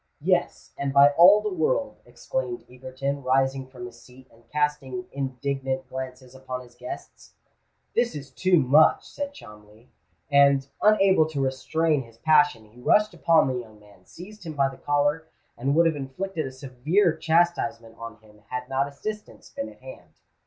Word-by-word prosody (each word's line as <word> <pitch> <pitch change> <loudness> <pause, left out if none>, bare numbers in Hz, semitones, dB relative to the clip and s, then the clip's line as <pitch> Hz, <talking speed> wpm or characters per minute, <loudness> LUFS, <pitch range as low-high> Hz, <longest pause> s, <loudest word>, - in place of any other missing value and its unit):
"Yes—and 140 -1 -1
by 140 +1 +7
all 180 +7 +7
the 210 -2 -3
world," 265 - 0
exclaimed 445 -8 -5
Egerton, 130 +2 -5
rising 135 0 +1
from 125 -2 -10
his 120 - -12
seat, 130 +1 -17
and 115 +1 -24
casting 150 -4 -2
indignant 135 0 -3
glances 130 -1 -8
upon 130 -1 -6
his 125 -1 -16
guests. - - -10 0.6
"This 235 0 +1
is 140 -1 -8
too 185 -1 +2
much!" 150 +2 +4
said 285 -1 -5
Cholmondeley; 105 - -15 0.4
and, 140 -1 +4
unable 195 -6 +4
to 150 -3 -4
restrain 150 +3 0
his 115 -2 -15
passion, 145 -6 +3
he 120 +2 -17
rushed 210 +9 +3
upon 165 -2 +3
the 130 -1 -2
young 110 -3 -12
man, 100 -3 -20
seized 205 +4 -12
him 160 -2 -6
by 140 -2 +1
the 135 - -12
collar, 145 +2 0 0.3
and 135 +4 -1
would 170 +1 +5
have 165 -2 +2
inflicted 155 +4 -4
a - - -7
severe 140 +8 0
chastisement 160 -9 0
on 115 -1 -8
him 105 -1 -20
had 125 0 -4
not 135 +1 0
assistance 210 +10 -8
been 280 0 -5
at - - -18
hand. - - -12
140 Hz, 165 wpm, -25 LUFS, 130-165 Hz, 0.6 s, by